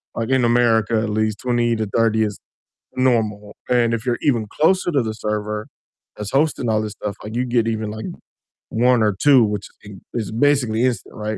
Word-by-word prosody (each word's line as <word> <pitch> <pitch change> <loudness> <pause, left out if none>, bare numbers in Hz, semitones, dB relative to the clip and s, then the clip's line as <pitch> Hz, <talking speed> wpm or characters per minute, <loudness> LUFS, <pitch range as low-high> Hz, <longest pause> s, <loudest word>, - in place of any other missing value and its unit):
like, 115 +1 -3
in 130 -1 +2
America 115 -2 +3
at 110 0 -2
least 110 0 0
20 120 -2 +1
to 110 -1 -1
30 110 -1 +3
is 105 -2 -3 0.5
normal 110 -5 0
and 120 -2 +3
if 115 +1 -3
you're 120 -2 0
even 120 -6 +1
closer 180 - +2
to 140 -4 +2
the 110 -2 -3
server 105 0 -3 0.5
that's 105 -1 -5
hosting 135 -4 +1
all 110 -1 +2
this 105 -1 -5
stuff, 105 -1 -6
like, 110 +2 -7
you 125 - +1
get 120 -2 +1
even, 110 -2 -2
like, 110 +1 -6 0.6
1 125 +1 +3
or 105 -2 +2
2, 140 -4 +6
which 105 -2 -2 0.2
is 105 - -12 0.2
is 115 -4 -3
basically 120 -2 +2
instant, 120 -8 -2
right? 110 0 -4
115 Hz, 195 wpm, -21 LUFS, 105-125 Hz, 0.6 s, 2